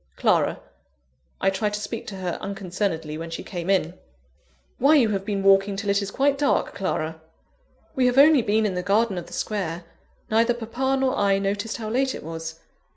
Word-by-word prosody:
Clara. - - +2 0.8
I 195 - +2
tried 205 +2 -1
to - - -4
speak 215 +2 -6
to 200 - -6
her 185 -2 -4
unconcernedly, 180 -5 -3
when 165 0 -6
she 165 - -6
came 175 -1 -5
in. 180 -4 +2 0.9
"Why, 285 +5 +5
you 245 -7 +4
have 195 -2 -1
been 195 -1 -2
walking 195 0 +4
till 200 0 -1
it 200 +1 +2
is 200 - -4
quite 275 +5 +1
dark, 285 -1 +1
Clara!" 160 -4 -3 0.7
"We 255 -1 +3
have 250 +1 +1
only 290 -1 +7
been 215 0 +1
in 200 - 0
the 180 - -2
garden 200 +1 +1
of 170 - -10
the - - -12
Square 175 -5 -3 0.5
neither 230 +2 +3
papa 250 +4 -1
nor 265 -1 +1
I 200 -1 +2
noticed 200 +2 -2
how 220 -2 -5
late 260 +2 +1
it - - -8
was. 160 0 -6
200 Hz, 195 wpm, -24 LUFS, 185-230 Hz, 0.9 s, only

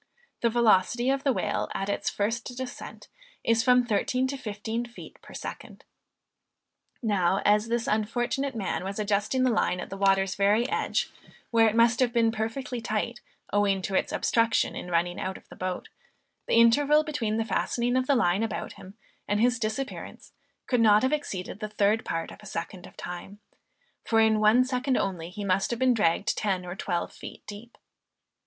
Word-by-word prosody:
The 235 - +3
velocity 235 +2 +3
of 275 0 -1
the 275 - +3
whale - - -1
at 195 - -2
its 200 - -1
first 230 +4 -3
descent 260 -1 -7 0.4
is 230 0 +2
from 250 -1 +4
thirteen 245 +4 0
to 275 - -3
fifteen 220 -1 -4
feet 240 0 -12
per - - -13
second. - - -8 1.2
Now 195 -3 +2
as 210 +2 +4
this 235 0 -1
unfortunate 240 +5 -1
man 200 -4 -2
was 195 +1 -5
adjusting 210 +4 0
the 255 - +3
line 180 -5 +1
at - - -7
the 195 - -5
water's 195 -1 +2
very 205 +5 +2
edge, - - -1 0.4
where 225 -1 +5
it 215 - -4
must 235 +1 +4
have 255 -2 +3
been 230 -2 +3
perfectly 225 +3 -3
tight, 225 +2 -2 0.3
owing 200 -2 +2
to 195 - -3
its - - +1
obstruction 230 -1 +1
in 180 - -6
running 175 +1 0
out 190 0 -3
of - - -19
the - - -11
boat, 185 -1 -4 0.6
the - - +2
interval 285 +6 +5
between 240 -8 -2
the 225 - 0
fastening 240 +2 0
the 255 +2 +2
line 195 -4 +2
about 225 -3 -3
him 190 +2 -13 0.3
and 205 0 +1
his 245 +1 +2
disappearance 230 +5 -5 0.3
could 250 -3 +1
not 215 0 +5
have 260 +3 +2
exceeded 200 -10 -4
the 215 -1 -4
third 210 +1 +1
part 165 0 -3
of - - -12
a 210 - -12
second 175 +1 -6
of - - -18
time, 180 +3 -7 0.6
for 225 - +2
in 220 -1 +4
one 220 +4 +5
second 255 0 0
only 175 -4 -2
he 200 +3 -6
must 190 0 +1
have 235 - -2
been 260 0 +3
dragged 210 -2 +1
ten 190 -4 -1
or 175 0 -6
twelve 175 -3 -3
feet - - -11
deep. 210 +3 -10
220 Hz, 185 wpm, -27 LUFS, 200-240 Hz, 1.2 s, where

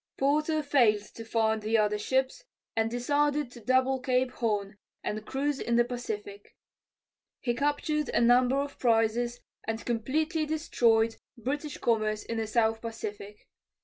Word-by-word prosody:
Porter 305 +3 +1
failed 235 -8 +3
to 230 - -8
find 220 -1 +1
the 220 +2 +1
other 210 -1 +1
ships 265 - 0 0.3
and 225 0 +1
decided 285 +3 0
to 245 - -11
double 260 +3 +2
Cape 255 0 +1
Horn 210 -3 -2 0.2
and 215 0 -3
cruise 280 +1 -1
in 235 - 0
the 240 0 +4
Pacific. 210 -5 -6 0.8
He 240 - -1
captured 295 +2 0
a - - +1
number 245 +2 +4
of 280 0 -3
prizes, 235 +1 +1 0.2
and 225 0 -3
completely 305 +8 0
destroyed 230 -8 +2 0.2
British 285 +5 -3
commerce 215 -2 0
in 230 - -4
the 220 - -2
south 225 0 +1
Pacific. 210 -2 -7
240 Hz, 145 wpm, -29 LUFS, 220-275 Hz, 0.8 s, the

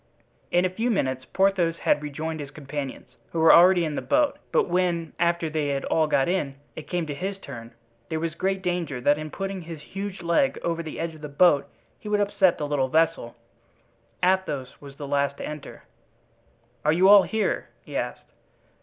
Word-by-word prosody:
In 175 +1 +3
a - - +2
few 225 +6 -1
minutes 130 - -1
Porthos 190 -4 +2
had 150 - +1
rejoined 155 +2 -4
his 145 -2 -6
companions, 140 -2 -7
who 165 - -2
were 160 0 +7
already 175 0 +6
in 155 - -3
the - - -2
boat; 295 0 +1
but - - +2
when, 175 -2 0
after 170 -1 +1
they 155 -1 -1
had 140 -1 -2
all 160 -1 +2
got 135 -3 +2
in, 160 -7 -1 0.2
it 155 - -8
came 175 -2 -1
to 150 - -4
his 190 +6 -4
turn, 115 -10 -9 0.4
there 160 - -2
was 165 0 -2
great 190 +2 -1
danger 175 -7 -2
that 145 +4 +2
in 155 0 -5
putting 195 +2 -4
his 165 -2 -8
huge 195 -1 -6
leg 170 +11 +2
over 170 0 -1
the 160 -2 -7
edge 165 0 -3
of 155 - -14
the 150 - -6
boat 145 0 +4 0.3
he 210 - -8
would 210 0 +2
upset 195 -3 +3
the 150 - -3
little 145 -3 0
vessel. 160 -6 +1 0.9
Athos 180 -8 +1
was 140 -1 -11
the 145 0 -7
last 140 0 0
to - - -5
enter. 150 -2 -8 1.0
"Are 150 - +3
you 180 +4 +4
all 200 0 +9
here?" 220 +2 -1
he - - -10
asked. - - -4
165 Hz, 200 wpm, -25 LUFS, 145-185 Hz, 1.0 s, all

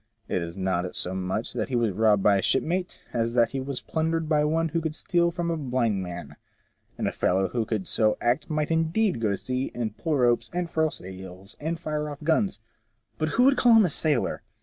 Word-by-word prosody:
It 90 - -1
is 85 +2 -6
not 90 -1 -1
so 90 - -2
much 95 +4 -3
that 110 -3 -2
he 130 - -1
was 115 -3 +2
robbed 105 0 +3
by 100 -1 +5
a - - 0
shipmate, 180 - 0
as 115 0 0
that 115 -1 +4
he 135 - -2
was 135 0 -4
plundered 160 0 -1
by 150 -1 +3
one 165 +2 +1
who 165 +2 -1
could 155 -1 -3
steal 170 +1 +1
from 170 0 -2
a 165 - -1
blind 125 -8 0
man 90 -1 -7 0.3
— - - -41
and - - -1
a - - 0
fellow 95 +1 +1
who 115 +3 -1
could 105 -5 -2
so 110 -1 +2
act 120 +1 0
might 155 0 -1
indeed 165 - +1
go 110 - +2
to 100 - 0
sea, 130 +4 -3
and 115 -3 -3
pull 160 -3 0
ropes, 120 -2 +2
and 175 -1 -2
furl 160 0 +2
sails, 95 -2 -9
and 165 +2 -3
fire 150 -1 -3
off 145 0 -8
guns; 165 - +1 0.6
but 155 - 0
who 245 - +6
would 270 0 +5
call 240 -2 +6
him 220 -2 +7
a 175 - 0
sailor? 145 -4 +1
130 Hz, 230 wpm, -26 LUFS, 105-160 Hz, 0.6 s, him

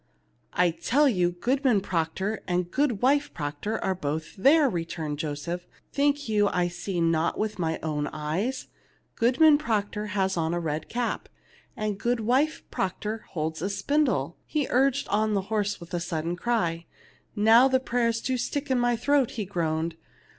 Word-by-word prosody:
"I 180 -1 +3
tell 235 - +2
you, 180 -8 +2
Goodman 250 +4 +2
Proctor 190 +4 -2
and 180 -1 -1
Goodwife 275 +1 +2
Proctor 150 +8 -3
are 190 - +1
both 160 -2 -4
there," 285 +8 +5
returned 165 - -3
Joseph. 155 +4 -4 0.3
"'Think 285 0 +1
you 210 -2 +3
I 180 -2 +1
see 175 +1 -4
not 165 0 +1
with 215 -2 -2
my 160 -2 0
own 150 -2 -1
eyes? 165 - -2 0.5
Goodman 290 +6 +5
Proctor 210 -5 -1
has 190 -1 +1
on 165 +1 0
a - - 0
red 155 -2 -3
cap, 240 0 -2 0.5
and 210 -2 -2
Goodwife 245 +6 +1
Proctor 210 +4 -3
holds 160 -2 -3
a 190 - -1
spindle." 285 +6 0
He 300 -3 0
urged 270 +2 +2
on 215 0 +1
the 195 - +1
horse 205 -1 0
with 170 +1 -12
a 175 - 0
sudden 170 0 -2
cry. 175 -6 -1 0.5
"Now 225 +4 +6
the 260 -1 +3
prayers 235 -2 0
do 260 -1 -1
stick 275 +3 -3
in 255 - +3
my 240 0 +2
throat," 270 +2 +2
he 210 - -2
groaned. 165 -3 -1
205 Hz, 160 wpm, -27 LUFS, 170-245 Hz, 0.5 s, Now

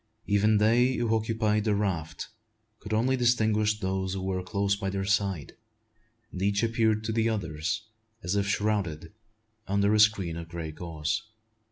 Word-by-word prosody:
Even 105 +1 +3
they 120 +5 +4
who 115 -1 +1
occupied 110 -1 0
the 105 -2 +2
raft 95 -6 -2 0.5
could 105 - -9
only 120 +5 +2
distinguish 110 -4 +2
those 95 -1 -2
who 95 - -4
were 95 -1 -1
close 100 +2 0
by 100 -1 -3
their 95 0 -2
side; 100 -6 -1 0.8
and 90 - -6
each 100 +2 +1
appeared 110 -2 +1
to 110 - -2
the 115 0 +1
others 85 0 -2 0.4
as 90 +3 -1
if 100 -1 +1
shrouded 100 -6 -1 0.5
under 100 +1 +2
a 110 - +3
screen 100 -6 +3
of 85 0 -7
grey 85 -2 -5
gauze. 80 +4 -3
100 Hz, 160 wpm, -28 LUFS, 95-110 Hz, 0.8 s, they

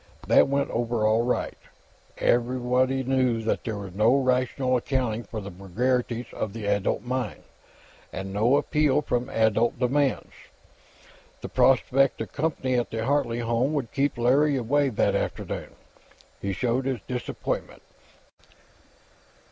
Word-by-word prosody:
That - - +5
went 140 0 0
over 115 -2 0
all 110 +1 +3
right. 125 +1 -1 0.6
Anybody 125 +2 +1
knew 130 -3 +1
that 110 - -1
there 110 -3 -3
was 100 -3 -7
no 110 +6 +4
rational 130 0 +1
accounting 120 -3 -1
for 110 - -6
the 100 0 -8
vagaries 120 +6 -1
of 105 - -4
the 110 -2 -6
adult 100 0 0
mind, 120 -9 -3 0.7
and 95 0 -6
no 115 +7 +3
appeal 150 -1 +2
from 125 -3 -1
adult 110 +1 +2
demands. 135 +2 0 1.1
The - - -6
prospect 135 +1 +3
of - - -6
company 145 -4 -1
at 120 - -3
the 110 0 -3
Hartley 130 -4 0
home 120 +5 0
would 135 -6 -2
keep 140 -1 0
Larry 135 +4 +3
away, 140 +4 +1
that 110 - +1
afternoon. - - -3 0.7
He 100 - -2
showed 120 +6 -1
his 130 -5 -2
disappointment. 125 -1 -4
125 Hz, 135 wpm, -26 LUFS, 115-135 Hz, 1.1 s, That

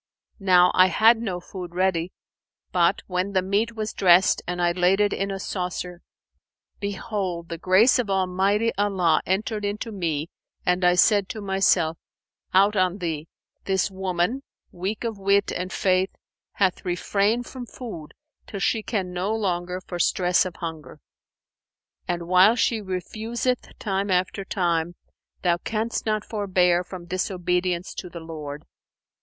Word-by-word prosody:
Now 180 -2 +5
I 185 0 +6
had 225 +5 +4
no 190 -6 -3
food 175 -1 -9
ready; 180 -2 +1 0.6
but, 175 +1 +2
when 185 +2 -2
the 185 -1 +2
meat 210 +5 0
was 215 -1 -3
dressed 185 -1 +5
and 180 0 -3
I 175 0 +3
laid 180 +2 +2
it 205 -1 +2
in 195 +1 -2
a 195 0 -4
saucer, 180 -2 -4 0.8
behold, 195 -4 -3
the 170 -1 -5
grace 190 +9 +5
of 230 -5 -1
Almighty 195 +4 +1
Allah 190 -6 +2
entered 210 +3 -1
into 205 +3 -3
me 165 -5 -2 0.3
and 180 +1 +1
I 180 0 +5
said 200 +2 +4
to 220 - -5
myself, 190 -4 +2 0.5
'Out 200 +3 +4
on 185 -1 +2
thee! 165 -4 -4 0.4
This 190 0 +1
woman, 190 +6 -1 0.3
weak 195 +6 -4
of 225 -3 -3
wit 200 +1 +2
and 180 +1 -4
faith, 185 0 +2 0.4
hath 190 -3 +1
refrained 200 +6 0
from 250 -1 -8
food 210 -14 -9 0.3
till 200 - -6
she 220 +3 +1
can 195 -5 -3
no 185 +4 -1
longer, 180 -3 -2
for 175 -1 -7
stress 180 0 +3
of 180 - -9
hunger; 160 -2 -7 1.1
and, 170 -1 -3
while 185 +5 +6
she 225 -2 +1
refuseth 220 +6 -3
time 195 0 -2
after 185 +1 0
time, 175 -3 -1 0.5
thou 175 -2 +3
canst 220 +5 -3
not 215 -1 0
forbear 180 -4 +2
from 180 -1 -9
disobedience 180 0 -1
to 180 - -7
the 170 - -8
Lord!' 155 -3 -7
185 Hz, 150 wpm, -24 LUFS, 175-205 Hz, 1.1 s, I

